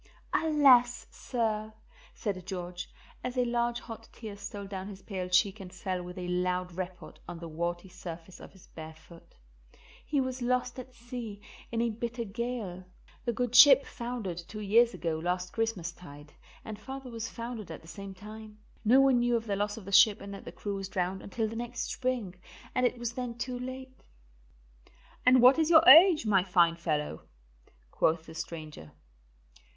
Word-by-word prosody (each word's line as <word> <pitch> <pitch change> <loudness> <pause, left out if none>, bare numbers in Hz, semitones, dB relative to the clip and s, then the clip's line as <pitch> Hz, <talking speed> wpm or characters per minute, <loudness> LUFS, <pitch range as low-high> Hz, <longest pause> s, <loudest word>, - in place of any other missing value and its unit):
"Alas, 270 -6 +5
sir," 220 -3 -2 0.4
said 195 -4 -3
George, 180 -1 -5 0.3
as 250 0 -4
a 250 - +3
large 240 0 0
hot 225 -1 -10
tear 215 -3 -8
stole 200 0 -7
down 195 -1 -6
his 195 -2 -10
pale 185 -3 -4
cheek 190 +3 +3
and 185 -2 -9
fell 185 0 -3
with 180 +1 -9
a 180 -1 -4
loud 180 0 -1
report 180 0 -7
on 175 0 -6
the 170 0 -8
warty 170 +3 -3
surface 175 -1 -9
of - - -12
his 190 - -18
bare 160 0 -10
foot, 165 +1 -17 0.7
"he 290 - 0
was 260 -1 -2
lost 250 +1 0
at 255 0 -10
sea 235 -4 -7 0.3
in 230 0 0
a 235 - 0
bitter 235 +2 -4
gale. 220 -4 -4 0.4
The 240 - +1
good 245 +1 -2
ship 275 +1 +9
foundered 235 -8 -5
two 205 +5 -8
years 230 +3 +4
ago 165 -2 -2
last 180 +2 -2
Christmastide, 170 -9 -4 0.3
and 215 -1 -7
father 265 +2 -8
was 230 -1 -5
foundered 230 -4 -6
at 160 - -8
the - - -15
same 195 +2 -8
time. 215 +2 -11 0.3
No 240 +5 +6
one 270 -2 +4
knew 240 0 +2
of 230 -1 -1
the 205 -3 -1
loss 205 +1 -2
of 215 - -10
the 200 - -7
ship 205 +1 +6
and 200 0 -8
that 195 - -9
the - - -7
crew 205 - -5
was 195 -1 -5
drowned 185 +1 -2
until 220 +2 -2
the 220 - -7
next 240 +1 -4
spring, 250 -8 -2 0.4
and 255 0 +3
it 245 - -4
was 235 -1 -3
then 245 -1 -5
too 250 +1 -4
late." 260 +1 -8 1.3
"And 255 -1 +7
what 260 +5 +8
is 320 0 +2
your 320 -1 +7
age, 320 +1 +9
my 195 -4 +4
fine 175 -3 +3
fellow?" 150 - -2 0.7
quoth 160 0 +1
the 160 - -11
stranger. 155 - -8
210 Hz, 180 wpm, -30 LUFS, 180-240 Hz, 1.3 s, ship